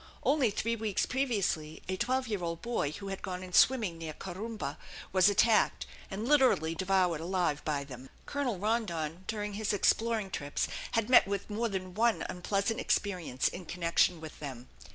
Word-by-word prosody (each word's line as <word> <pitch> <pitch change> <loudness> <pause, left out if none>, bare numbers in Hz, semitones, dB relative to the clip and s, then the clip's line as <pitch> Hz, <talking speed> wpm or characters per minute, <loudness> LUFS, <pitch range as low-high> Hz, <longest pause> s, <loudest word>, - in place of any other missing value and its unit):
Only 280 -5 +3
three 230 +3 -1
weeks 215 -3 0
previously 200 - -1
a 185 - -1
twelve 255 +6 0
year 210 -4 -2
old 170 -1 -4
boy 235 -11 -1
who 200 +4 -7
had 195 - -5
gone 185 -1 -5
in 180 -1 -10
swimming 215 -10 +4
near 160 -2 -5
Corumba 190 -3 -5 0.3
was 190 +1 +6
attacked, 215 +2 +3 0.2
and 210 +4 -4
literally 255 - +4
devoured 185 -2 +1
alive 175 -4 0
by 145 -2 -1
them. 130 -1 -10 0.2
Colonel 270 -7 -2
Rondon 185 -5 -2
during 210 -1 -3
his 210 +1 -1
exploring 220 0 +1
trips 145 -4 -2 0.3
had 225 -2 +1
met 250 -4 +7
with 200 +1 -3
more 230 +3 0
than 185 -2 -4
one 230 +3 +2
unpleasant 200 +5 -1
experience 180 - 0
in 175 -2 -6
connection 170 0 +2
with 160 -1 -9
them. 130 -4 -7
195 Hz, 170 wpm, -31 LUFS, 165-225 Hz, 0.3 s, met